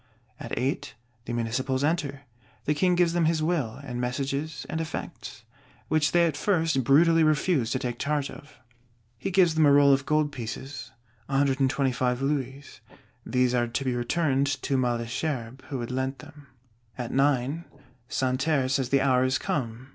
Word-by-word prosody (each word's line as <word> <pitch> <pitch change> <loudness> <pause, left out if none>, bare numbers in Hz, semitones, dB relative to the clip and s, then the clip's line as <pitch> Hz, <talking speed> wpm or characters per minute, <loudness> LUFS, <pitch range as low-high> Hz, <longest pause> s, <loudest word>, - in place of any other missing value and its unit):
At - - -5
eight, 130 -2 -2 0.3
the 120 - -4
Municipals 130 +3 -1
enter: 145 -3 -1 0.4
the 150 - +2
King 180 +4 +2
gives 175 -1 +3
them 170 -1 +2
his 160 -1 +1
Will, 150 -9 -1
and 125 -3 -4
messages 140 +3 -3
and 160 - -3
effects; 160 - -7 0.5
which 155 -1 +2
they 175 -1 +4
at 160 -3 0
first 160 -5 +1
brutally 165 +5 +5
refuse 155 -4 +2
to 130 - 0
take 125 -2 -4
charge 145 -1 -1
of; 145 - -13 0.6
he - - -2
gives 180 -3 +4
them 160 -2 +4
a - - +6
roll 140 0 +6
of 135 0 0
gold 155 -1 +2
pieces, 130 +2 -6 0.4
125 135 -2 +1
louis; 135 0 -3 0.5
these 125 -1 +2
are 120 -1 +2
to 125 +3 -3
be 130 - +1
returned 135 +2 +1 0.2
to 140 - 0
Malesherbes, 120 +1 -2
who 135 -3 -4
had 120 - -5
lent 130 +1 -2
them. 145 -1 -14 0.5
At 125 -2 -4
nine, 140 +3 +1 0.4
Santerre 130 +1 +1
says 130 -1 0
the 140 0 +3
hour 130 -2 +3
is 130 +1 +2
come. 125 -2 -3
135 Hz, 160 wpm, -27 LUFS, 130-155 Hz, 0.6 s, a